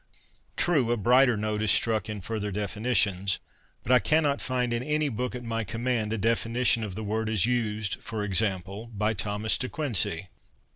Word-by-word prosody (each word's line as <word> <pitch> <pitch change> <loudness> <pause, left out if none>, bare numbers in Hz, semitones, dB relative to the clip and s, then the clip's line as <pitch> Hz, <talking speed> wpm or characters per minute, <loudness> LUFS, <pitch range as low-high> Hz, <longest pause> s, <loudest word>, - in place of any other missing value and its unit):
True, 145 -9 +2
a 120 - +1
brighter 125 +2 +4
note 105 0 -2
is 110 - +1
struck 110 0 +2
in 105 -2 -5
further 105 +1 -3
definitions; 100 -2 0 0.5
but 125 - -2
I 125 - +7
cannot 145 +4 +1
find 125 -2 0
in 120 - 0
any 150 +2 0
book 125 +1 -3
at 125 - -6
my 115 -1 -2
command 115 +1 -2
a 115 - -1
defini 115 +3 0
tion 115 -2 +4
of 100 -4 -5
the 110 - -5
word 110 +1 -2
as 105 -3 +2
used, 110 -4 -1
for 110 -2 -4
example, 100 +1 -1
by 110 -1 -1
Thomas 105 +1 0
De 130 - -2
Quincey. 95 - -1
110 Hz, 185 wpm, -27 LUFS, 105-125 Hz, 0.5 s, I